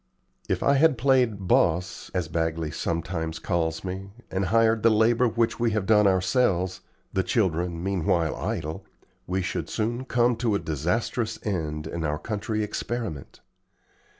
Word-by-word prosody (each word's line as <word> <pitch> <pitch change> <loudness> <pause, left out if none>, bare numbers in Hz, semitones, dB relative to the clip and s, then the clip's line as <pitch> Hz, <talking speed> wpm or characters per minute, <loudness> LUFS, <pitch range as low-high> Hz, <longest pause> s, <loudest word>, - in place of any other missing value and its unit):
If - - 0
I 140 0 +4
had 155 -2 +4
played 120 -6 +2
'boss,' 85 0 +1
as 90 -3 0
Bagley 80 -1 -1
sometimes 80 0 -3
calls 80 -1 -1
me, 95 +1 -5 0.2
and 95 +1 0
hired 115 +3 +3
the 115 - +5
labor 115 +3 +4
which 115 0 0
we 115 0 +2
have 105 -3 0
done 105 -1 +5
ourselves, 95 -1 +1 0.3
the 95 - +2
children 90 -5 0
meanwhile 90 -4 +1
idle, 80 +4 -4 0.4
we 95 +1 -1
should 85 - -3
soon 120 +4 -2
come 120 -1 +2
to 115 -3 +1
a - - +3
disastrous 90 - -1
end 75 -7 -2
in 80 +1 -4
our 75 -1 -1
country 110 +3 -2
experiment. 105 - -5
95 Hz, 150 wpm, -26 LUFS, 85-115 Hz, 0.4 s, the